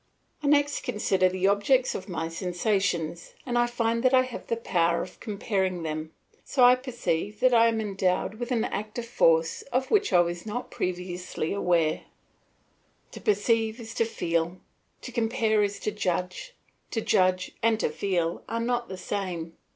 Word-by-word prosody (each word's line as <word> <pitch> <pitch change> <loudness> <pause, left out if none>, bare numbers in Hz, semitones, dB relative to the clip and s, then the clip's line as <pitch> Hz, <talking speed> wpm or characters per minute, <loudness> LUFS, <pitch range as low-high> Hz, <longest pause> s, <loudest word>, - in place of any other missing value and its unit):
I 290 - -2
next 290 0 +3
consider 195 -6 +1
the 185 +1 -1
objects 205 +6 +3
of 190 - -6
my 165 -2 -2
sensations, 175 -1 -1
and 245 - -2
I 240 0 +3
find 230 -1 0
that 255 +1 +4
I 255 - +6
have 255 -2 -8
the 230 - -1
power 170 -6 +1
of - - -11
comparing 190 -4 -2
them, 155 0 -4 0.3
so 260 - +2
I 245 0 +9
perceive 235 -6 -2
that 255 -1 +5
I 230 0 +6
am 225 -1 +1
endowed 195 0 -1
with 240 +1 -4
an 235 -3 +2
active 215 +3 -4
force 165 -8 +2
of 260 +2 0
which 415 -1 +3
I 175 - +6
was 175 0 -2
not 230 +4 -5
previously 180 -2 -3
aware. 170 -5 +1 1.1
To - - -10
perceive 220 +2 +1
is 225 -1 -8
to 230 - +1
feel; 170 -4 -1 0.5
to 250 - -7
compare 225 -2 +1
is 205 0 0
to 215 - -1
judge; 205 - -3 0.3
to 225 - -2
judge 185 -2 +2
and 225 -1 +2
to - - +1
feel 175 -4 -1
are 230 - -1
not 240 0 -1
the 190 - -6
same. 180 -4 -4
205 Hz, 170 wpm, -27 LUFS, 180-235 Hz, 1.1 s, I